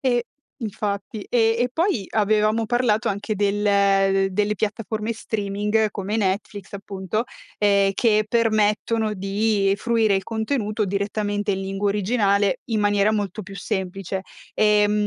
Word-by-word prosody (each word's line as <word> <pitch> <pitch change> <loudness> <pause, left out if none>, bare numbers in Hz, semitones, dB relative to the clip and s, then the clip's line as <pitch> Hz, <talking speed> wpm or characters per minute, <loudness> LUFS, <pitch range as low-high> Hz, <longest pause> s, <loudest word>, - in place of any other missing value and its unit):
e 245 -3 +1 0.3
infatti, 210 -2 -4
ehm, 225 -2 +3
e 250 - -1
poi 320 - 0
avevamo 215 +1 +2
parlato 235 -1 +1
anche 205 +2 -2
del 200 -1 +2
delle 210 +2 +1
piattaforme 215 +1 -2
streaming 210 0 -1
come 205 +1 -3
Netflix 200 -1 -2
appunto, 200 +2 -3 0.3
ehm, 200 -1 +3
che 215 -1 +2
permettono 220 -1 +1
di 195 0 +1
fruire 225 -1 +2
il 195 - 0
contenuto 220 -1 -1
direttamente 205 +1 -1
in 190 - -2
lingua 195 +1 -2
originale 205 +1 +1
in 225 -3 -1
maniera 205 0 +3
molto 205 0 -2
più 195 +1 -10
semplice, 190 -1 -3 0.3
ehm, 210 -1 +4
210 Hz, 125 wpm, -23 LUFS, 200-220 Hz, 0.3 s, ehm